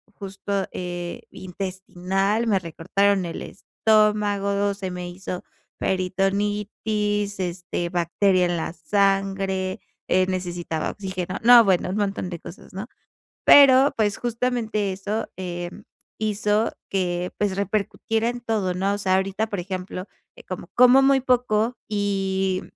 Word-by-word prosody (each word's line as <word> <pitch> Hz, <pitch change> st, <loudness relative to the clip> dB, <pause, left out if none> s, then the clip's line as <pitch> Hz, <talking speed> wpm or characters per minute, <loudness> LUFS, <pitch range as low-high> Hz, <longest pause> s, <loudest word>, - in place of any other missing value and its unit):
justo, 195 Hz, 0 st, -3 dB
eh, 175 Hz, -1 st, -5 dB
intestinal, 190 Hz, +3 st, -2 dB
me 200 Hz, -3 st, +3 dB
recortaron 190 Hz, +4 st, +1 dB
el 165 Hz, -, -5 dB
estómago, 205 Hz, -2 st, +1 dB
se 190 Hz, -2 st, -5 dB
me 180 Hz, 0 st, -5 dB
hizo 180 Hz, 0 st, -6 dB, 0.3 s
peritonitis, 205 Hz, +2 st, -1 dB
este, 175 Hz, -1 st, -3 dB
bacteria 180 Hz, +2 st, +2 dB
en 175 Hz, -1 st, -1 dB
la 160 Hz, +1 st, -3 dB
sangre, 195 Hz, -1 st, 0 dB, 0.3 s
eh, 185 Hz, 0 st, +4 dB
necesitaba 175 Hz, -3 st, -3 dB
oxígeno. 185 Hz, -2 st, -4 dB
No, 240 Hz, -1 st, +9 dB
bueno, 185 Hz, -2 st, +2 dB
un 190 Hz, -, -2 dB
montón 200 Hz, -3 st, -1 dB
de 170 Hz, -2 st, -6 dB
cosas, 180 Hz, -, -12 dB
¿no? 195 Hz, +5 st, -6 dB, 0.6 s
Pero, 275 Hz, 0 st, +7 dB
pues, 205 Hz, -2 st, +1 dB
justamente 230 Hz, -4 st, -1 dB
eso, 205 Hz, +4 st, -3 dB
eh, 175 Hz, -1 st, -5 dB, 0.5 s
hizo 210 Hz, 0 st, +1 dB, 0.2 s
que, 180 Hz, -2 st, -1 dB
pues, 200 Hz, -2 st, 0 dB
repercutiera 215 Hz, +3 st, -1 dB
en 245 Hz, 0 st, -4 dB
todo, 210 Hz, -6 st, -1 dB
¿no? 195 Hz, +2 st, 0 dB
O -, -, -3 dB
sea, 185 Hz, -2 st, +1 dB
ahorita, 195 Hz, +3 st, 0 dB
por 200 Hz, -4 st, -3 dB
ejemplo, 185 Hz, 0 st, -5 dB, 0.3 s
eh, -, -, -13 dB
como 185 Hz, -2 st, -6 dB
como 250 Hz, +2 st, +7 dB
muy 270 Hz, 0 st, +4 dB
poco 245 Hz, -2 st, +1 dB
y 195 Hz, -2 st, 0 dB
195 Hz, 130 wpm, -24 LUFS, 185-210 Hz, 0.6 s, No